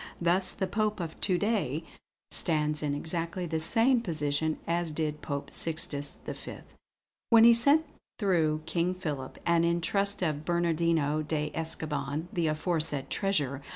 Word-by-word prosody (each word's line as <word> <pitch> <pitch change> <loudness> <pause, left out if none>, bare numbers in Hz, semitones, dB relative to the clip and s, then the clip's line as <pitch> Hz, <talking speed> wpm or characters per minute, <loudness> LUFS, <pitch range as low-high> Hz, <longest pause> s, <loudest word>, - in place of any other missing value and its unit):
Thus, 180 +2 +2
the 190 - -2
Pope 210 +1 -1
of 165 -2 -6
to 185 -3 +2
day 185 - 0 0.5
stands 150 -2 +1
in 145 -2 -1
exactly 165 +3 -2
the 160 -1 -2
same 230 +9 +3
position 155 -4 -1
as 170 0 0
did 150 -1 -3
Pope 140 -1 -4
Sixtus 145 -3 -1
V, - - -7 0.7
when 230 -1 +7
he 235 0 +9
sent 280 +7 +4 0.3
through 160 -7 +1
King 170 +3 0
Philip, 145 -7 -5
and 170 -1 +3
in 170 0 +2
trust 200 +3 0
of 155 -3 -1
Bernardino 165 -3 +1
de 150 -1 -2
Escoban 155 -1 -2
the 170 -2 0
aforesaid 155 -3 -1
treasure." 145 -9 0
165 Hz, 145 wpm, -29 LUFS, 150-185 Hz, 0.7 s, he